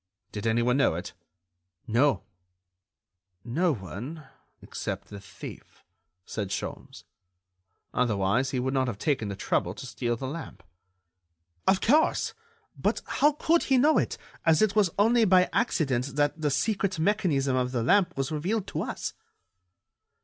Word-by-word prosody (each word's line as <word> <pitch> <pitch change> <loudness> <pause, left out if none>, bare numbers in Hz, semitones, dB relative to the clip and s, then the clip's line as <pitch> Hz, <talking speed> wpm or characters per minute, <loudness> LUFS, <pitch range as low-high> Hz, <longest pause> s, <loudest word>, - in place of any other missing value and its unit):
"Did 105 +2 -4
anyone 120 +3 +2
know 140 -12 +3
it?" 85 - -6 0.7
"No." 130 +6 +2 1.2
"No 165 +9 +1
one—except 125 - -7
the 100 - -8
thief," 100 - -11 0.4
said 105 -3 -4
Sholmes. - - -6 0.9
"Otherwise 120 +1 +1
he 130 - -1
would 130 +2 -1
not 130 -1 +1
have 115 -5 -3
taken 130 -3 0
the 100 - -4
trouble 90 -1 -1
to 110 - -8
steal 120 0 -2
the 130 - -6
lamp." 160 +5 -7 1.0
"Of 190 - +4
course. 300 +7 +3 0.4
But - - -1
how 295 +1 +3
could 330 +3 +2
he 265 - +3
know 295 +5 +5
it, - - -2 0.3
as 165 +3 +4
it 215 -1 +1
was 205 -4 +4
only 225 +3 +4
by 185 -3 +4
accident 135 - 0
that 145 +2 +1
the 150 - +2
secret 195 +6 0
mechanism 155 -7 +1
of 125 -1 0
the 120 -3 -1
lamp 180 - +3
was 135 +1 -1
revealed 185 +7 -1
to - - -3
us." - - -4
140 Hz, 140 wpm, -27 LUFS, 120-190 Hz, 1.2 s, know